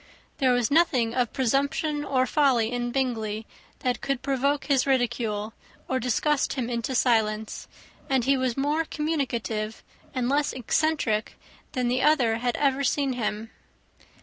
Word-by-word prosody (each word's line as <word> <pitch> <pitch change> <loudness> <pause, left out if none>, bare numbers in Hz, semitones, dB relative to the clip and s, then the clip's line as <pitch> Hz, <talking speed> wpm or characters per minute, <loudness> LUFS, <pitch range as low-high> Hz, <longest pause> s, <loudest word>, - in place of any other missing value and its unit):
There 260 -2 +4
was 245 -1 +1
nothing 265 -8 +3
of 245 -2 0
presumption 280 +3 0
or 260 -3 +1
folly 255 -5 +2
in 245 0 -2
Bingley 225 -5 -2 0.4
that 250 -1 -1
could 275 -2 -2
provoke 280 +1 0
his 275 -2 +2
ridicule, 225 -5 0 0.3
or 260 - 0
disgust 270 +5 +1
him 250 -3 -3
into 240 +3 -2
silence; 220 -3 +1 0.4
and 265 -3 +2
he 275 +1 +4
was 255 -2 -1
more 295 +4 +1
communicative, 245 -9 -2 0.3
and 255 -2 -1
less 285 +2 +1
eccentric, 255 -3 0 0.4
than 250 -1 0
the 250 +2 +1
other 250 -7 +3
had 245 0 -1
ever 280 -1 +1
seen 275 0 +1
him. 220 -2 -3
255 Hz, 145 wpm, -26 LUFS, 230-280 Hz, 0.4 s, There